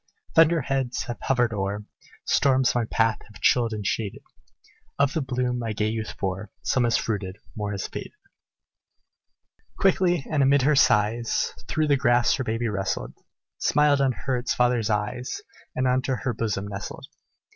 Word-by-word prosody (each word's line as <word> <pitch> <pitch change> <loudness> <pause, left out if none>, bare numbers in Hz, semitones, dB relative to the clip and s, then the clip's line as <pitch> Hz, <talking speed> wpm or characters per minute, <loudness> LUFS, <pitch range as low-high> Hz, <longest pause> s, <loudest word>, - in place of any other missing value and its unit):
Thunder 165 0 +5
heads 135 -2 -1
have 120 - -6
hovered 120 -3 +1
o'er 100 +1 -3 0.4
Storms 130 -2 +3
my 120 -2 +1
path 115 0 +1
have 105 - -14
chilled 120 -2 +3
and 105 -2 -4
shaded; 105 0 -2 0.7
Of 140 0 +2
the 160 - 0
bloom 125 -1 -1
my 115 -2 -3
gay 105 +1 0
youth 110 -1 -4
bore, 95 +2 -3
Some 130 -2 +2
has 115 - +3
fruited 100 -3 -3 0.2
more 105 -1 -3
has 100 -1 -3
faded." - - -7 1.6
Quickly, 180 -5 +2
and 155 -3 +1
amid 135 0 +4
her 150 +2 +4
sighs, 115 -2 +2
Through 155 0 +1
the 140 -1 +4
grass 120 -3 +3
her 130 - -1
baby 115 0 -1
wrestled, 95 -3 -2 0.5
Smiled 145 -1 +3
on 135 -2 +2
her 130 +1 -2
its 120 - -1
father's 120 -3 +2
eyes, 105 - -2 0.3
And 130 0 +1
unto 130 +1 +1
her 125 0 -2
bosom 105 -3 -2
nestled. 100 0 -7
120 Hz, 160 wpm, -25 LUFS, 105-135 Hz, 1.6 s, Thunder